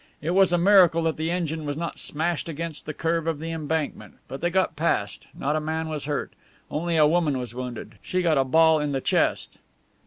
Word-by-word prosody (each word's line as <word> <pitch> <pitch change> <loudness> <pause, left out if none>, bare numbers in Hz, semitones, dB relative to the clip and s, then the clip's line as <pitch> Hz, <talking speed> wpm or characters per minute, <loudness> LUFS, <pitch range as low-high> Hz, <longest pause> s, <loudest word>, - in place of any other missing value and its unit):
It 160 +3 -2
was 190 0 +4
a 175 - +3
miracle 175 -3 +5
that 160 -1 0
the 160 +1 -2
engine 165 -3 -2
was 145 -1 -3
not 170 +1 -4
smashed 165 +2 -2
against 165 0 -5
the 155 - -3
curve 165 0 -1
of 165 -2 0
the 165 +2 -5
embankment. 160 -1 -3
But 135 - -7
they 175 - +1
got 185 -1 +1
past. 160 +3 -1
Not 150 +2 -1
a - - +1
man 160 +1 -3
was 150 -3 -4
hurt. 145 -1 -3 0.4
Only 170 +2 -1
a 155 - +6
woman 155 -3 +2
was 125 -2 -5
wounded. 125 -1 -7
She 185 0 -1
got 160 -5 +3
a - - +4
ball 160 +4 +4
in 150 -1 -2
the 135 - -1
chest." - - 0
160 Hz, 220 wpm, -25 LUFS, 150-170 Hz, 0.4 s, a